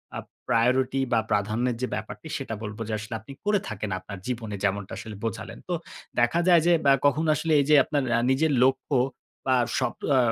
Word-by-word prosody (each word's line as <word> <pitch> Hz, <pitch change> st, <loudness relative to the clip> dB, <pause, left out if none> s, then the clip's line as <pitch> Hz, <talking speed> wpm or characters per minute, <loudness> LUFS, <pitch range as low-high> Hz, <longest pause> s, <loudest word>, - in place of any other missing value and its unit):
আ -, -, -3 dB, 0.3 s
priority 125 Hz, +3 st, +2 dB
বা 115 Hz, -, +4 dB
প্রাধান্যের 110 Hz, +4 st, +1 dB
যে 130 Hz, -, 0 dB
ব্যাপারটি, -, -, -7 dB
সেটা 110 Hz, -, -5 dB
বলব 105 Hz, 0 st, -6 dB
যে 110 Hz, -, -3 dB
আসলে 110 Hz, +2 st, -7 dB
আপনি 110 Hz, +5 st, -13 dB
করে 205 Hz, -1 st, +3 dB
থাকেন 105 Hz, 0 st, -4 dB
আপনার 100 Hz, +1 st, -9 dB
জীবনে 115 Hz, -4 st, -3 dB
যেমনটা 100 Hz, 0 st, -1 dB
আসলে 110 Hz, -2 st, -7 dB
বোঝালেন। 110 Hz, -, -5 dB
তো -, -, 0 dB, 0.5 s
দেখা 120 Hz, +8 st, +3 dB
যায় 170 Hz, -3 st, +7 dB
যে 175 Hz, -, +6 dB
বা 140 Hz, -, +6 dB
কখনো 155 Hz, +3 st, +3 dB
আসলে 155 Hz, +1 st, 0 dB
এই 140 Hz, -, +2 dB
যে 150 Hz, -, +7 dB
আপনার 145 Hz, -3 st, -1 dB
অ্যা 115 Hz, -, +3 dB
নিজের 150 Hz, +3 st, +2 dB
লক্ষ্য 135 Hz, +1 st, +1 dB, 0.5 s
বা 130 Hz, -1 st, +3 dB, 0.2 s
স্বপ -, -, 0 dB, 0.2 s
আ -, -, +5 dB
125 Hz, 200 wpm, -26 LUFS, 110-140 Hz, 0.5 s, যায়